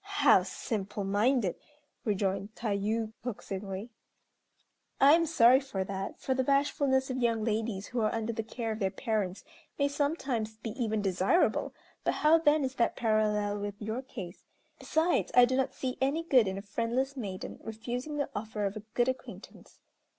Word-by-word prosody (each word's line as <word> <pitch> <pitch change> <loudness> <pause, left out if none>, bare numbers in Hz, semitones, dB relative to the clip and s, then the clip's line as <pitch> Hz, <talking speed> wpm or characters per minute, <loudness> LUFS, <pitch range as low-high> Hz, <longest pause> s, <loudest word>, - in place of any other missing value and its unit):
"How 290 - +4
simple 200 +1 -4
minded!" 205 +1 +1 0.5
rejoined 200 0 -1
Tayû, 220 0 -1
coaxingly, 200 -2 -5 1.1
"I 280 +2 +8
am 330 0 +4
sorry 255 -4 +6
for 265 -9 -3
that, 195 0 -5
for 265 - 0
the 260 0 +1
bashfulness 275 -1 +2
of 255 - -2
young 230 -3 +1
ladies 220 -2 -1
who 245 - -2
are 215 - +2
under 225 0 -2
the 225 - -2
care 230 0 -4
of 220 - -4
their 195 -3 +1
parents 205 -2 -2 0.3
may 280 - +2
sometimes 280 -7 -1
be 225 0 -5
even 220 -3 -1
desirable, 195 - +2 0.3
but - - +1
how 315 +2 +5
then 305 -2 +3
is 260 -1 -2
that 235 - +2
parallel 210 -3 +1
with 205 0 -5
your 220 +4 -3
case? 195 -9 -9 0.4
Besides, 325 +3 +1
I 245 - +9
do 255 +1 -1
not 265 0 0
see 255 -1 -3
any 285 +5 +1
good 255 -9 +4
in 190 0 -2
a 195 - -6
friendless 235 +6 -1
maiden 200 -8 -6
refusing 245 +6 -5
the 285 -1 -2
offer 210 0 -3
of 200 +1 -2
a 215 - -5
good 240 0 +3
acquaintance." 260 0 -7
230 Hz, 170 wpm, -30 LUFS, 205-265 Hz, 1.1 s, I